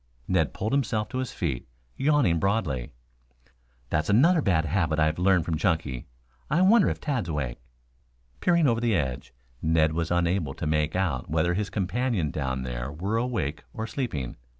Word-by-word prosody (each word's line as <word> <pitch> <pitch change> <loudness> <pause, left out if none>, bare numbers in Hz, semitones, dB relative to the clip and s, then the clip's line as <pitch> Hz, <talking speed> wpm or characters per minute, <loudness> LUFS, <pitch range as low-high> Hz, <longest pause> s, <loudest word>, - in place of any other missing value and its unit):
Ned 80 -7 +2
pulled 110 +3 -3
himself 110 -6 0
to 130 - -3
his 130 -2 -3
feet, 70 -9 -3 0.3
yawning 135 - +3
broadly. 85 - 0 1.0
"That's 75 - 0
another 155 - +5
bad 85 - +2
habit 80 -1 0
I 80 - +4
have 80 +2 -1
learned 90 -2 +3
from 80 -2 -1
Chunky. 80 -8 -1 0.4
I 170 +5 +3
wonder 205 +2 +5
if - - -3
Tad's 125 - -2
awake." 70 -6 -3 0.8
Peering 170 -3 +3
over 115 -2 +1
the 115 -3 +2
edge, 65 -7 -2 0.3
Ned 80 -1 +3
was 85 0 -1
unable 85 -4 0
to - - -4
make 75 +1 0
out 85 -10 -1
whether 80 +3 +1
his 100 +3 -1
companion 100 - -1
down 65 -3 -2
there - - -4
were 95 +9 -2
awake 110 - -2
or 110 -1 -3
sleeping. 95 - -4
85 Hz, 170 wpm, -26 LUFS, 75-115 Hz, 1.0 s, another